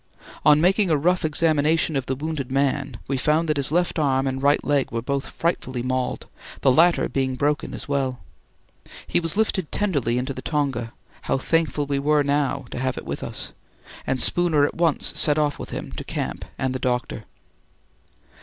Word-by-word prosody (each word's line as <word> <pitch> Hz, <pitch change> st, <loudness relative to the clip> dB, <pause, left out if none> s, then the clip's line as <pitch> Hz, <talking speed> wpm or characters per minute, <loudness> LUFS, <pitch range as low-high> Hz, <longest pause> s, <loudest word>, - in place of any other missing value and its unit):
On 150 Hz, 0 st, +6 dB
making 190 Hz, +3 st, +3 dB
a 155 Hz, -, +3 dB
rough 180 Hz, +5 st, +1 dB
examination 155 Hz, 0 st, +2 dB
of 135 Hz, -2 st, -2 dB
the 130 Hz, -, -1 dB
wounded 145 Hz, -2 st, -4 dB
man, 135 Hz, -2 st, 0 dB
we 135 Hz, -, -1 dB
found 155 Hz, +5 st, +1 dB
that 155 Hz, -1 st, 0 dB
his 140 Hz, 0 st, +1 dB
left 175 Hz, 0 st, +1 dB
arm 135 Hz, -3 st, +2 dB
and 135 Hz, 0 st, -2 dB
right 145 Hz, +1 st, +3 dB
leg 145 Hz, -2 st, +1 dB
were 115 Hz, 0 st, -3 dB
both 140 Hz, +1 st, -2 dB
frightfully 130 Hz, -7 st, -2 dB
mauled, 130 Hz, 0 st, -2 dB, 0.4 s
the 135 Hz, -, +5 dB
latter 170 Hz, +6 st, +4 dB
being 130 Hz, -1 st, -1 dB
broken 145 Hz, +2 st, 0 dB
as -, -, -7 dB
well. 135 Hz, -3 st, -1 dB, 0.9 s
He -, -, +2 dB
was 165 Hz, +3 st, -2 dB
lifted 195 Hz, -6 st, 0 dB
tenderly 140 Hz, -, 0 dB
into 130 Hz, +2 st, -2 dB
the 130 Hz, -, -7 dB
tonga 135 Hz, -7 st, -2 dB, 0.3 s
how -, -, 0 dB
thankful 150 Hz, 0 st, 0 dB
we 140 Hz, -1 st, -1 dB
now 145 Hz, -1 st, +1 dB
were 120 Hz, -, -17 dB
to -, -, -5 dB
have 130 Hz, -1 st, -1 dB
it -, -, -6 dB
with -, -, -4 dB
us! -, -, -5 dB, 0.5 s
and 130 Hz, -, 0 dB
Spooner 160 Hz, -1 st, +3 dB
at -, -, -2 dB
once 165 Hz, -3 st, 0 dB
set 150 Hz, -1 st, +6 dB
off 150 Hz, -1 st, 0 dB
with -, -, -7 dB
him -, -, -6 dB
to -, -, -6 dB
camp -, -, -4 dB
and 130 Hz, -1 st, -1 dB
the 130 Hz, -, -3 dB
doctor. 125 Hz, -3 st, -2 dB
140 Hz, 190 wpm, -23 LUFS, 130-155 Hz, 0.9 s, On